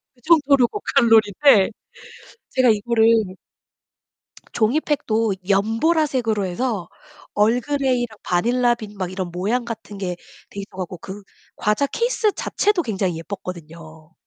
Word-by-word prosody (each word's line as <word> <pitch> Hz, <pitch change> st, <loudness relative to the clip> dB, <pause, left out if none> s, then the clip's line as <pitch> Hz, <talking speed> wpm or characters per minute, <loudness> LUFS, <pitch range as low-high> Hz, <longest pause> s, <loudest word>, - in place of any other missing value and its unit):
그 245 Hz, -, -28 dB
정도로 280 Hz, -5 st, +4 dB
고칼로리인데 225 Hz, -, +3 dB, 0.8 s
제가 255 Hz, -1 st, +3 dB
이거를 220 Hz, +1 st, +2 dB, 1.5 s
종이 235 Hz, +6 st, +1 dB
팩도 225 Hz, -7 st, 0 dB
연보라색으로 225 Hz, -, +1 dB
해서 195 Hz, -1 st, -3 dB, 0.4 s
얼그레이랑 245 Hz, +1 st, 0 dB
바닐라 240 Hz, +7 st, +1 dB
빈 210 Hz, -3 st, -10 dB
막 185 Hz, -2 st, -3 dB
이런 185 Hz, -1 st, -4 dB
모양 215 Hz, +8 st, -1 dB
같은 220 Hz, -3 st, -7 dB
게 185 Hz, -2 st, -3 dB, 0.3 s
돼 200 Hz, -, -8 dB
있어 195 Hz, -1 st, -10 dB
갖고 180 Hz, -1 st, -5 dB
그 195 Hz, +4 st, -9 dB, 0.3 s
과자 215 Hz, +7 st, 0 dB
케이스 465 Hz, -, 0 dB
자체도 415 Hz, -4 st, 0 dB
굉장히 190 Hz, -, -2 dB
예뻤거든요. 165 Hz, -3 st, -9 dB
220 Hz, 280 characters per minute, -21 LUFS, 190-255 Hz, 1.5 s, 정도로